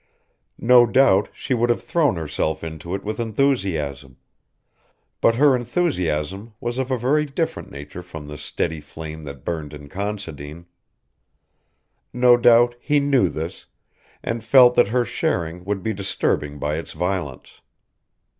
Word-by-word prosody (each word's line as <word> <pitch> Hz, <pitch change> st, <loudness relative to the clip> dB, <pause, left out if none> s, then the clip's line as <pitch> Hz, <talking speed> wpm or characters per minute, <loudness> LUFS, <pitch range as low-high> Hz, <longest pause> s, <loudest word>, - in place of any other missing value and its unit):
No 120 Hz, 0 st, +6 dB
doubt 115 Hz, -6 st, +4 dB
she 135 Hz, -, -3 dB
would 120 Hz, 0 st, +1 dB
have 120 Hz, -, +1 dB
thrown 155 Hz, -, +1 dB
herself 80 Hz, -1 st, -2 dB
into 80 Hz, +2 st, -5 dB
it -, -, -6 dB
with 110 Hz, +2 st, -4 dB
enthusiasm; 95 Hz, -, -1 dB, 1.0 s
but 115 Hz, -, +4 dB
her 140 Hz, +1 st, +5 dB
enthusiasm 110 Hz, -, -2 dB
was 120 Hz, +2 st, -3 dB
of 130 Hz, 0 st, -2 dB
a 130 Hz, -, +1 dB
very 135 Hz, +6 st, +2 dB
different 160 Hz, +3 st, -3 dB
nature 70 Hz, +5 st, -9 dB
from 80 Hz, -4 st, -10 dB
the 75 Hz, -, -7 dB
steady 80 Hz, +2 st, -3 dB
flame 80 Hz, 0 st, -9 dB
that 70 Hz, -3 st, -9 dB
burned 75 Hz, -3 st, -4 dB
in 75 Hz, -1 st, -12 dB
Considine. 85 Hz, -6 st, -6 dB, 1.5 s
No 125 Hz, 0 st, +5 dB
doubt 120 Hz, 0 st, +5 dB
he 145 Hz, +3 st, +2 dB
knew 135 Hz, -9 st, +3 dB
this, 80 Hz, +2 st, -6 dB, 0.6 s
and 115 Hz, -1 st, -3 dB
felt 125 Hz, +1 st, +7 dB
that 120 Hz, -, +4 dB
her 120 Hz, +3 st, +1 dB
sharing 85 Hz, -4 st, -2 dB
would 100 Hz, -2 st, -2 dB
be 110 Hz, -, -1 dB
disturbing 75 Hz, -6 st, -1 dB
by 75 Hz, +2 st, -2 dB
its -, -, -8 dB
violence. 90 Hz, -7 st, -4 dB
100 Hz, 145 wpm, -22 LUFS, 80-120 Hz, 1.5 s, felt